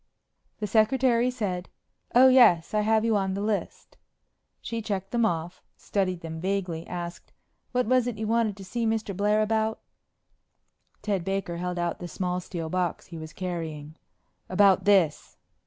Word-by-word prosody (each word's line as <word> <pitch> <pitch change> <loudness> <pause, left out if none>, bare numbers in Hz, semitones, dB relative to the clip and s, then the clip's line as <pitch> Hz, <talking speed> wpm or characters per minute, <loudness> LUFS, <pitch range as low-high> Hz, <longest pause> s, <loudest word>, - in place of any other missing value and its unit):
The 215 - -3
secretary 235 +3 +3
said, 200 -8 -3 0.5
"Oh, 255 +2 +8
yes. 235 -11 +5
I 210 - +2
have 220 +1 +2
you 225 -1 +2
on 190 -1 0
the - - -3
list." 210 -1 -3 0.6
She 230 -1 -4
checked 195 -2 -4
them 235 -2 +2
off, 170 0 -4 0.2
studied 185 -3 -1
them 160 0 -6
vaguely, 180 -3 -2
asked, 175 -1 -7 0.4
"What 250 0 +1
was 250 +1 +2
it 240 -3 -3
you 220 - -3
wanted 220 -2 +1
to 195 - -9
see 230 +4 -2
Mr. 220 -3 -1
Blair 210 +2 +2
about?" 220 0 0 1.2
Ted 200 -4 -1
Baker 195 -2 -2
held 180 0 -3
out 175 -1 -2
the 175 - -6
small 180 +1 -2
steel 170 -2 -5
box 180 +1 -2
he 170 - -9
was 155 0 -8
carrying. 160 -4 -5 0.5
"About 195 +1 +4
this." 190 -7 +2
195 Hz, 160 wpm, -27 LUFS, 175-220 Hz, 1.2 s, Oh